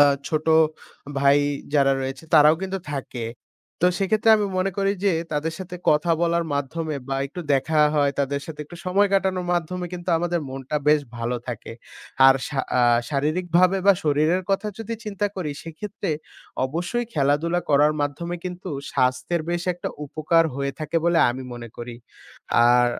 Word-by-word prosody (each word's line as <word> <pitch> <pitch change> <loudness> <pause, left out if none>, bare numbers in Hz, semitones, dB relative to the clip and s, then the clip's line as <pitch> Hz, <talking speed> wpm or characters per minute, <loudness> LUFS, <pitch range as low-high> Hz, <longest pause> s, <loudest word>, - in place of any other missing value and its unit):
আ - - +10 0.3
ছোটো 155 +1 0 0.7
ভাই 140 +1 +5 0.4
যারা 135 -2 +4
রয়েছে 135 +2 -5
তারাও 150 0 +7
কিন্তু 190 0 -2
থাকে। 130 -4 -5 0.6
তো - - +6
সেক্ষেত্রে 215 +3 +2
আমি 210 -1 0
মনে 185 +1 +1
করি 195 0 +2
যে, 200 - +4 0.2
তাদের 150 +2 -1
সাথে 180 -1 -7
কথা 155 +3 +2
বলার 170 0 +1
মাধ্যমে 150 +2 -3
বা 135 - -1
একটু 175 +6 -8
দেখা 155 +3 +1 0.2
হয়, 145 -1 +3
তাদের 140 0 0
সাথে 150 -2 -8
একটু 175 +4 -12
সময় 200 +3 +3
কাটানো 190 -1 +2
মাধ্যমে 175 +1 -2
কিন্তু 175 0 -7
আমাদের 175 0 -1
মনটা 135 +2 -4
বেশ 150 0 +5 0.2
ভালো 120 +1 -2
থাকে। 115 -2 -6 0.5
আর 135 - +8
শা 140 -2 -1 0.2
আ - - +5 0.3
শারীরিকভাবে 175 +5 +2
বা 200 - +9
শরীরের 155 +5 +2
কথা 195 +2 0
যদি 225 +1 -4
চিন্তা 205 -1 -1
করি। 175 -5 -3
সেক্ষেত্রে 195 +4 -5 0.6
অবশ্যই 175 - -2
খেলাধুলা 150 +4 +1
করার 145 +1 +5
মাধ্যমে 170 +5 -2
কিন্তু 180 +1 -6 0.2
স্বাস্থ্যের 130 +7 0
বেশ 175 0 -1
একটা 175 - -5 0.2
উপকার 155 +3 +2
হয়ে 140 0 -2
থাকে 155 +1 -2
বলে 170 -1 +3
আমি 130 +2 -6
মনে 120 -1 -8
করি। 120 0 -7 0.7
আর 120 0 +5
160 Hz, 160 wpm, -23 LUFS, 140-180 Hz, 0.7 s, আ